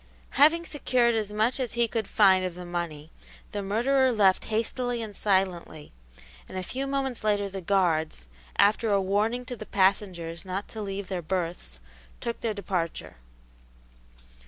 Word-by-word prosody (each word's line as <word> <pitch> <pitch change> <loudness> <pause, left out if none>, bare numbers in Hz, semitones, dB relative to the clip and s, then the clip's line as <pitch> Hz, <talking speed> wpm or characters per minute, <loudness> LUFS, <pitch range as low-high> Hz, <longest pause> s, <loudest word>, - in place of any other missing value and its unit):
Having 325 +4 +5
secured 250 -6 +2
as 215 -2 -1
much 220 +5 +1
as 250 -4 -2
he 235 0 +2
could 225 -2 -2
find 190 -3 +5
of 180 -2 -3
the 180 0 -8
money, 165 -3 -5 0.4
the 205 - -3
murderer 255 +7 +2
left 200 -5 +3
hastily 240 +2 -1
and 215 -3 -6
silently, 185 -6 -1 0.6
and - - -6
a 185 - -2
few 265 +8 -3
moments 270 -4 -2
later 205 -1 +1
the 195 -1 -6
guards, 165 - +1 0.3
after 215 +2 +4
a 200 -1 +3
warning 210 +6 0
to 250 -1 -5
the 215 - -8
passengers 185 -4 0
not 190 +1 -4
to 220 - -6
leave 200 -1 -4
their 185 -2 -3
berths, 170 - -3 0.4
took 235 -1 -4
their 220 -2 -1
departure. 180 - -3
200 Hz, 160 wpm, -27 LUFS, 185-235 Hz, 0.6 s, Having